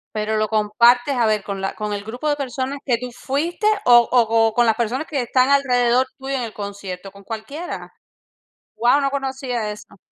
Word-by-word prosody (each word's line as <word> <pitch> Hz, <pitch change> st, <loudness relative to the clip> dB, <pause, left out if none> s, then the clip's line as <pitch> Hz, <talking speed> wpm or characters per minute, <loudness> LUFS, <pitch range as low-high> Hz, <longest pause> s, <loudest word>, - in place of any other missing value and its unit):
Pero 215 Hz, 0 st, -1 dB
lo 215 Hz, -, +1 dB
compartes, 235 Hz, +5 st, +3 dB
a 235 Hz, -2 st, +2 dB
ver, 215 Hz, -2 st, +1 dB
con 200 Hz, -1 st, -5 dB
la 195 Hz, -, -3 dB
con 210 Hz, -1 st, -3 dB
el 200 Hz, 0 st, -4 dB
grupo 245 Hz, +7 st, -5 dB
de 290 Hz, -, +2 dB
personas 270 Hz, 0 st, -4 dB
que 245 Hz, -4 st, +1 dB
tú 250 Hz, +1 st, -7 dB
fuiste 315 Hz, -, -2 dB, 0.2 s
o 240 Hz, -1 st, +7 dB
o 240 Hz, -3 st, +4 dB
co 225 Hz, 0 st, +3 dB
con 240 Hz, -1 st, +4 dB
las 225 Hz, -, +3 dB
personas 240 Hz, +6 st, -2 dB
que 280 Hz, -4 st, -1 dB
están 255 Hz, +2 st, +2 dB
alrededor 255 Hz, -2 st, +3 dB
tuyo 270 Hz, 0 st, -4 dB
en 260 Hz, -, -1 dB
el 225 Hz, -, -6 dB
concierto, 200 Hz, -2 st, -7 dB
¿con 200 Hz, 0 st, -16 dB
cualquiera? 280 Hz, -, -7 dB, 0.9 s
Guau, 245 Hz, +5 st, +3 dB
no 275 Hz, -, +1 dB
conocía 265 Hz, -5 st, -3 dB
eso. 210 Hz, -1 st, -12 dB
240 Hz, 200 wpm, -21 LUFS, 215-265 Hz, 0.9 s, o